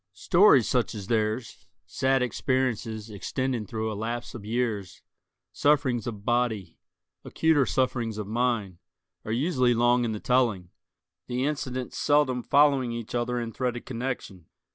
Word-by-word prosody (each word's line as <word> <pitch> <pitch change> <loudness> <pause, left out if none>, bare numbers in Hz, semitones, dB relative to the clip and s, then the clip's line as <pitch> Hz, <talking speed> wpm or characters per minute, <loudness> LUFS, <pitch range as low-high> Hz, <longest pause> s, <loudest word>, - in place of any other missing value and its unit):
Stories 170 - +5
such 125 -2 0
as 100 -2 -6
theirs—sad 110 +2 -1
experiences 120 -4 -1
extending 120 +2 -3
through 110 +1 -3
a - - -3
lapse 115 +4 -4
of 120 -5 -8
years, 110 -4 -3 0.5
sufferings 140 -5 +2
of 105 -3 -6
body, 120 -7 0 0.5
acuter 160 -5 +2
sufferings 120 -4 0
of 105 - -4
mind—are 110 -3 -4
usually 125 -1 +2
long 120 +1 +3
in 115 - -1
the 105 - -4
telling, 110 -9 +1 0.6
the 125 +2 -1
incidents 130 -4 -3
seldom 145 -4 +2
following 140 -2 +3
each 115 -1 -6
other 120 0 -1
in 115 -1 -5
threaded 125 -1 -3
connection. 120 -8 -5
120 Hz, 130 wpm, -27 LUFS, 110-130 Hz, 0.6 s, Stories